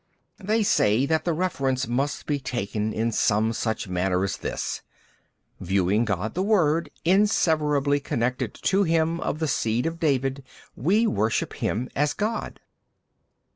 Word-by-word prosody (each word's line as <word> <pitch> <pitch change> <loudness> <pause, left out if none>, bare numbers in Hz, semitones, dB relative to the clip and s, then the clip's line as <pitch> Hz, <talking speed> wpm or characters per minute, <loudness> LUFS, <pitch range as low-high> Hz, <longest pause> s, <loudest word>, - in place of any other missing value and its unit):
B. 195 - -12
They 220 +1 +2
say 115 - +3
that 160 +2 0
the 175 - +1
reference 135 -7 -1
must 135 +4 -1
be 145 -1 -1
taken 110 -4 -3
in 115 +2 -1
some 110 +1 +2
such 110 -2 -2
manner 90 0 0
as 100 - -1
this: - - -4 0.8
viewing 95 +4 +1
God 105 0 -2
the 185 - -1
Word 170 -6 +2 0.2
inseverably 155 -7 +2
connected 125 -2 -2
to 195 +1 +3
him 165 -2 +1
of 150 - -2
the 160 0 -1
seed 115 -3 0
of 165 0 -3
David 135 -3 0 0.3
we 200 - +2
worship 110 - 0
him 120 +5 -2
as 145 +1 +1
God. 215 +2 -3
140 Hz, 145 wpm, -25 LUFS, 110-165 Hz, 0.8 s, say